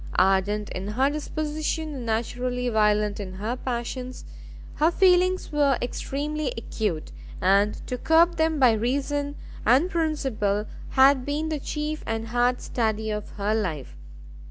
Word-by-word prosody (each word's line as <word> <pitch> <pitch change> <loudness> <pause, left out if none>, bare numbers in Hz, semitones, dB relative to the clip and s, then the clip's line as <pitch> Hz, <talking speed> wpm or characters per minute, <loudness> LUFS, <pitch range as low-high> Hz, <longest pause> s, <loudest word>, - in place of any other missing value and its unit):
Ardent 195 +3 +2
in 185 +2 -4
her 260 +7 +1
disposition, 305 +1 -3
and 255 -4 -6
naturally 245 +2 -1
violent 210 -2 +2
in 190 -2 -6
her 215 +6 -3
passions, 250 0 -5 0.5
her 310 +2 +4
feelings 365 0 +3
were 285 -3 +3
extremely 285 +3 -3
acute, 210 - -3 0.3
and 200 +3 +3
to 250 - -4
curb 335 +4 +4
them 320 0 +2
by 255 -3 +6
reason 285 +5 -1 0.3
and 275 +11 +4
principle 265 -11 0 0.2
had 265 0 +5
been 295 +3 -2
the 310 -2 -2
chief 300 +2 -4
and 225 0 -3
hard 245 +1 +1
study 220 -2 -1
of 210 0 -4
her 205 +1 0
life. 160 - -3
250 Hz, 135 wpm, -25 LUFS, 210-300 Hz, 0.5 s, by